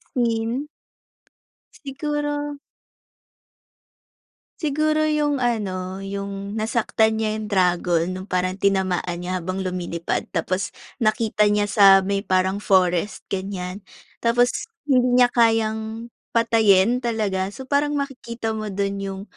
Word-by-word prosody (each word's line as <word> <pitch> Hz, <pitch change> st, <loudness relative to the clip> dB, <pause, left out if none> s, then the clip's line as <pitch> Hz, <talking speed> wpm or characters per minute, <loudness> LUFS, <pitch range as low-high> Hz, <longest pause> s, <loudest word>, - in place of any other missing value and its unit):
Scene. 235 Hz, +3 st, 0 dB, 1.2 s
Siguro 290 Hz, +1 st, -3 dB, 2.0 s
Siguro 310 Hz, 0 st, +1 dB
yung 295 Hz, -2 st, +1 dB
ano, 195 Hz, -5 st, -2 dB
yung 200 Hz, 0 st, -5 dB
nasaktan 220 Hz, 0 st, +1 dB
niya 220 Hz, -1 st, 0 dB
yung 215 Hz, -, -6 dB
dragon, 180 Hz, -3 st, +2 dB
nung 185 Hz, +2 st, -7 dB
parang 185 Hz, +1 st, -1 dB
tinamaan 190 Hz, -3 st, +1 dB
niya 180 Hz, +1 st, -3 dB
habang 185 Hz, +2 st, -3 dB
lumilipad 175 Hz, -2 st, -3 dB
tapos 185 Hz, +3 st, -1 dB, 0.3 s
nakita 215 Hz, -1 st, +2 dB
niya 205 Hz, 0 st, +2 dB
sa 195 Hz, -2 st, +6 dB
may 200 Hz, +1 st, 0 dB
parang 190 Hz, 0 st, 0 dB
forest, 185 Hz, -1 st, +1 dB
ganiyan, 190 Hz, 0 st, -4 dB, 0.4 s
tapos 245 Hz, +1 st, +1 dB, 0.2 s
hindi 250 Hz, -3 st, +3 dB
niya 245 Hz, -1 st, +5 dB
kayang 225 Hz, 0 st, +1 dB, 0.2 s
patayin 225 Hz, 0 st, +4 dB
talaga. 210 Hz, -6 st, -1 dB
So, 235 Hz, +7 st, -9 dB
parang 290 Hz, +2 st, +1 dB
makikita 240 Hz, -5 st, -4 dB
mo 215 Hz, -1 st, -4 dB
dun 200 Hz, 0 st, -2 dB
yung 195 Hz, 0 st, -5 dB
210 Hz, 110 wpm, -23 LUFS, 190-240 Hz, 2.0 s, sa